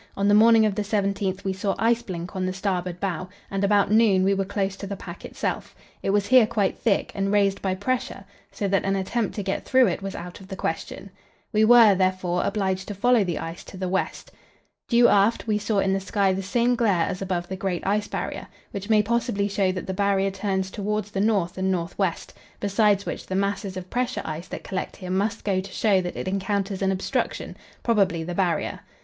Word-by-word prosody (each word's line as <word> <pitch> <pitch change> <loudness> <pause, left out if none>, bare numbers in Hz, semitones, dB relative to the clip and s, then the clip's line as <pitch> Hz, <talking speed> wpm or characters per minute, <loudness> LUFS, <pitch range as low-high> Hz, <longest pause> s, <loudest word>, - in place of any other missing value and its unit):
On 200 +1 +1
the 205 - +5
morning 220 +1 +6
of 210 - +1
the 210 - -2
17th 200 -2 -1
we 190 -2 -1
saw 190 +1 -1
ice 230 +1 +2
blink 180 -4 -6
on 185 - -1
the 185 - -2
starboard 185 -2 -2
bow, 185 -2 -3 0.2
and 195 0 -1
about 200 0 +3
noon 210 -4 +4
we 195 +1 +3
were 195 0 0
close 195 0 -2
to 200 - -6
the 200 - -4
pack 175 -2 -9
itself; - - -4 0.3
it - - -2
was 200 0 +2
here 245 0 +6
quite 210 -4 0
thick, 210 -4 +1
and 195 0 -1
raised 200 -1 +2
by 190 -1 0
pressure, 205 -1 -3 0.3
so 200 - -2
that 195 0 +1
an 195 0 0
attempt 200 +4 -1
to 205 - -3
get 195 0 -2
through 260 -1 +4
it 190 -2 -1
was 195 0 -5
out 175 +1 -8
of 190 - -13
the 190 - -6
question. 190 +2 -4 0.4
We 215 0 +4
were, 230 -2 +8
therefore, 185 -1 0
obliged 190 -2 -1
to 205 - -5
follow 240 +2 +3
the 175 -3 -2
ice 165 +1 -6
to 190 - -10
the 185 0 -3
west. 190 +1 -2 0.6
Due 240 0 +6
aft 205 +3 +3
we 215 -2 +1
saw 210 0 -1
in 195 0 +2
the 195 - +1
sky 195 0 +1
the 190 - -2
same 235 +5 +1
glare 200 -8 +2
as 180 - -4
above 180 -2 -2
the 190 - -4
great 185 -2 -3
Ice 205 +2 +1
Barrier, - - -4 0.2
which 200 -1 -6
may 215 -1 +5
possibly 230 -2 0
show 195 -2 +1
that 185 0 -5
the 190 - -3
Barrier 195 0 +1
turns 190 -1 -2
towards 210 0 -3
the 195 - -1
north 195 -4 +1
and 190 0 +1
north 170 -1 -2
west; 185 -4 -1 0.3
besides 205 0 +2
which, - - -5
the 185 - -3
masses 200 -1 -1
of 185 0 -8
pressure 250 +1 -1
ice 160 +2 -5
that - - -7
collect 185 - -4
here 185 -2 -7
must 200 +3 -1
go 190 -2 +1
to 190 0 -10
show 195 -1 +2
that 175 -1 -5
it - - -4
encounters 195 0 -1
an 195 0 +2
obstruction, 190 0 -2 0.3
probably 195 -8 +2
the 175 +2 -5
Barrier. 175 -2 0
195 Hz, 225 wpm, -24 LUFS, 185-210 Hz, 0.6 s, were